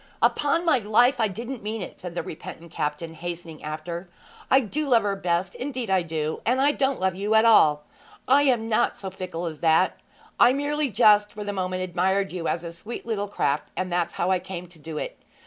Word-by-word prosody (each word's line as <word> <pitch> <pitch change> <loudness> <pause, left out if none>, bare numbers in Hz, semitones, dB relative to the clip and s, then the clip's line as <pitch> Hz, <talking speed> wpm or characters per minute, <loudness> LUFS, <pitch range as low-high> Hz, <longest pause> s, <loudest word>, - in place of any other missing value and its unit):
'Upon 320 +4 +2
my 315 -6 +4
life 240 +4 +3
I 220 - +3
didn't 235 +5 -6
mean 215 0 -4
it!' - - -10
said 180 -1 -7
the - - -2
repentant 170 0 -9
captain, 150 +3 -3
hastening 170 -1 -7
after. 170 +4 -5 0.4
'I 265 - +6
do 285 +6 -3
love 235 -4 +4
her 200 -1 0
best 180 -1 -1
indeed 255 -5 -4
I 190 -1 +4
do 160 -2 -3
and 250 +3 +1
I 280 +2 +4
don't 275 -2 0
love 190 0 +1
you 205 +4 0
at 220 +1 +6
all! 150 -10 +5 0.4
I 275 +3 +6
am 245 -5 +2
not 225 +1 +1
so 190 -1 -6
fickle 180 -2 -5
as 160 -3 -5
that! 165 +3 +3 0.4
I 240 +1 +7
merely 290 +1 0
just 210 -1 +5
for 210 - -6
the 205 0 -3
moment 185 -1 -2
admired 190 +2 0
you 175 -3 -3
as 170 - -1
a 170 - -5
sweet 210 +8 -8
little 210 -3 -2
craft, 145 -7 -1
and 185 -1 -2
that's 175 -1 0
how 180 +2 0
I 185 - +3
came 180 -1 -7
to 170 -2 -12
do 155 0 -7
it. - - -5
190 Hz, 215 wpm, -25 LUFS, 170-230 Hz, 0.4 s, I